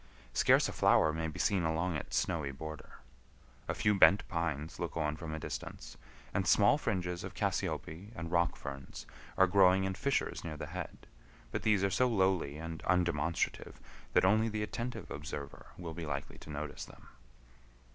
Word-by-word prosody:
Scarce - - +5
a - - -4
flower 80 - +4
may 80 0 -2
be 75 - -7
seen 100 -3 +2
along 80 +1 0
its 75 - -3
snowy 75 -4 0
border. 80 +2 -8 0.7
A - - -1
few 105 - +3
bent 100 0 +6
pines 80 -3 -3
look 85 -1 -3
on 75 -2 0
from 80 0 -6
a 80 - -3
distance, - - -6 0.4
and 95 -2 0
small 100 - +5
fringes 90 - -2
of - - -7
cassiope 85 +7 -2
and 85 -3 -5
rock 85 0 +2
ferns 70 -1 -8 0.3
are 95 - +7
growing 95 0 +5
in 95 0 -1
fissures 140 +8 -1
near 80 -2 -5
the - - -5
head, 90 -2 -6 0.5
but - - -2
these 105 -3 +3
are 100 - +2
so 125 +7 +3
lowly 95 - +1
and 80 0 -6
undemonstrative 85 -3 0 0.4
that - - +5
only 110 +4 +4
the 110 -1 -2
attentive 115 -1 -5
observer 70 0 -6
will 85 -3 -6
be 80 -1 -5
likely 70 -1 -4
to - - -13
notice 75 0 -5
them. - - -16
85 Hz, 175 wpm, -33 LUFS, 80-95 Hz, 0.7 s, are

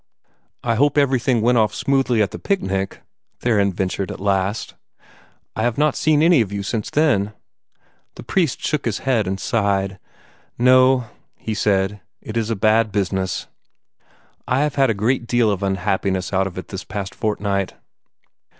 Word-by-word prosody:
"I 115 - +1
hope 145 +6 +2
everything 130 -4 +2
went 120 +1 +3
off 105 -1 +1
smoothly 135 -5 +2
at 100 - -3
the - - -7
picnic," 95 - -2 0.4
Theron 105 -5 +2
ventured, 95 +1 -2
at - - -7
last. 100 +2 -1 0.8
"I - - -2
have 120 0 0
not 150 -1 +2
seen 155 -1 +2
any 165 -5 +5
of 105 -3 -2
you 100 0 -3
since 105 +1 -3
then." 110 -10 +2 0.8
The - - -10
priest 170 -9 0
shook 150 - -1
his 115 -3 -1
head 120 -7 +1
and 95 +1 -2
sighed. 100 -3 0 0.6
"No," 130 +1 +5 0.3
he 110 - -5
said. 100 -1 0 0.2
"It 110 - -8
is 115 -1 -1
a 115 - 0
bad 110 +2 +2
business. 95 -2 -1 1.0
I 125 +2 +2
have 150 -1 0
had 135 -2 +3
a 110 - +1
great 115 +4 0
deal 120 -3 +2
of 100 -1 -2
unhappiness 95 0 -1
out 95 0 +2
of 95 - -9
it 95 - -7
this 95 0 -6
past 100 -1 -5
fortnight. 100 -3 -2
110 Hz, 165 wpm, -21 LUFS, 100-125 Hz, 1.0 s, any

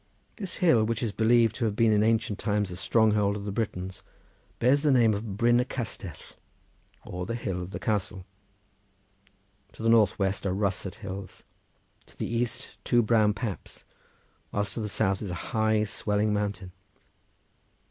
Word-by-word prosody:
This 195 -5 -5
hill, 160 - +4
which 115 +1 -1
is 115 - 0
believed 115 +1 +3
to 120 - 0
have 105 -2 -1
been 115 0 +4
in 105 -1 +4
ancient 110 -1 +1
times 105 -2 0
a - - -5
stronghold 105 +1 +2
of 100 -1 -6
the 100 - -3
Britons, 95 -4 -4 0.6
bears 130 +4 +3
the 150 - +2
name 120 -5 +5
of 100 -1 -4
Bryn 120 +2 +4
y - - +3
Castell 105 - -5 0.9
or 90 0 -5
the 115 - -2
hill 95 -6 -3
of 90 - -6
the - - -5
castle. 100 -3 -2 1.5
To - - -9
the 115 - +3
north 110 -4 +4
west 95 0 -1
are 95 - 0
russet 100 -1 -1
hills, 100 -3 -8 0.6
to - - -20
the - - -2
east 120 +2 -3
two 120 -1 +3
brown 110 -2 +3
paps, 105 -2 -6 0.7
whilst 100 0 -2
to - - -4
the 105 -1 -3
south 95 -1 0
is 105 - -4
a 90 - -3 0.2
high, 110 -1 +2
swelling 105 0 0
mountain. 100 -3 -2
105 Hz, 170 wpm, -27 LUFS, 100-115 Hz, 1.5 s, name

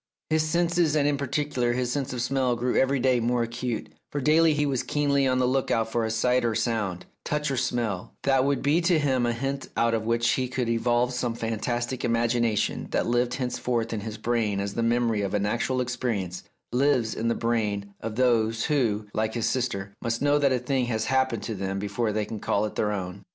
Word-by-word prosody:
His 155 0 +3
senses, 170 0 +1
and 145 -1 +3
in 145 - +2
particular 140 -3 -1
his 125 0 -1
sense 140 -1 -2
of 125 -2 -2
smell, 125 -1 +1
grew 125 +1 -1
every 135 +1 +3
day 125 -1 +3
more 120 +1 +1
acute, 120 0 -4 0.2
for 145 - -2
daily 155 +2 +4
he 150 0 +1
was 135 -3 0
keenly 140 -2 +1
on 130 0 +2
the 130 - +2
look 130 +1 +1
out 115 -1 +1
for 120 0 0
a - - -1
sight 125 +3 +2
or 115 -2 0
sound, 105 -5 -1
a - - -23 0.2
touch 150 -1 -1
or - - 0
smell, 120 -6 -2
that 135 -1 +3
would 140 0 0
be 150 +5 +3
to 170 -1 +3
him 130 -5 +1
a - - +2
hint 135 +3 -3
out 115 0 +2
of 115 - +1
which 115 0 +2
he 130 -1 +1
could 125 -1 -2
evolve 120 +2 +1
some 125 -2 -2
fantastic 120 +2 -2
imagination 115 -1 +1
that - - 0
lived 120 +1 +1
henceforth 125 -3 -2
in 110 - -2
his 110 +1 -6
brain 110 -3 0
as 100 0 -3
the 115 - -1
memory 115 -2 +1
of 100 0 -1
an 100 0 +1
actual 120 +4 0
experience 115 -8 -2 0.3
lives 125 -3 +2
in 115 - -2
the 115 - +1
brain 105 -4 -1
of 110 -1 -5
those 115 -2 +2
who, 115 -9 +1
like 110 +1 -1
his 115 - 0
sister, 100 -6 -2
must 115 0 -1
know 145 +1 +3
that 140 -2 +3
a 130 - +3
thing 125 +1 0
has 110 -2 -1
happened 130 -4 +1
to 110 - -3
them 95 -1 -3
before 105 +3 -1
they 105 0 -1
can 110 - -6
call 100 +1 0
it 105 - -5
their 105 - 0
own. 95 -1 -5
120 Hz, 225 wpm, -26 LUFS, 110-130 Hz, 0.3 s, daily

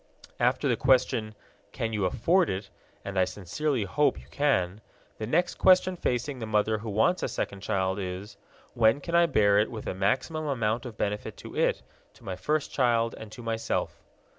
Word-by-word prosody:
After 125 +4 +2
the 125 - +3
question, 115 -4 +2 0.4
"Can 115 -1 -3
you 105 -3 0
afford 165 - +2
it?" 95 +1 -4 0.3
and 100 -1 -2
I 95 - +4
sincerely 115 - -2
hope 100 - +1
you 65 - -15
can 105 -9 +1 0.4
the 110 - -3
next 175 +8 +1
question 185 0 +5
facing 130 -3 -2
the 110 - -5
mother 110 0 +1
who 110 +1 -6
wants 110 - +2
a - - 0
second 100 -1 -4
child 95 0 -1
is, 95 +2 -5 0.4
"When 115 +2 +4
can 170 +4 -7
I 170 0 +5
bear 100 -8 +4
it 105 - +1
with 110 - -7
the - - -2
maximum 130 - -1
amount 115 -2 -1
of 110 -3 -10
benefit 105 0 -3
to - - -10
it, - - +1 0.3
to - - -20
my 95 - -4
first 150 +11 -1
child, 115 -3 +2
and 110 -1 -10
to 120 +1 -10
myself?" 115 0 -2
110 Hz, 190 wpm, -28 LUFS, 100-140 Hz, 0.4 s, question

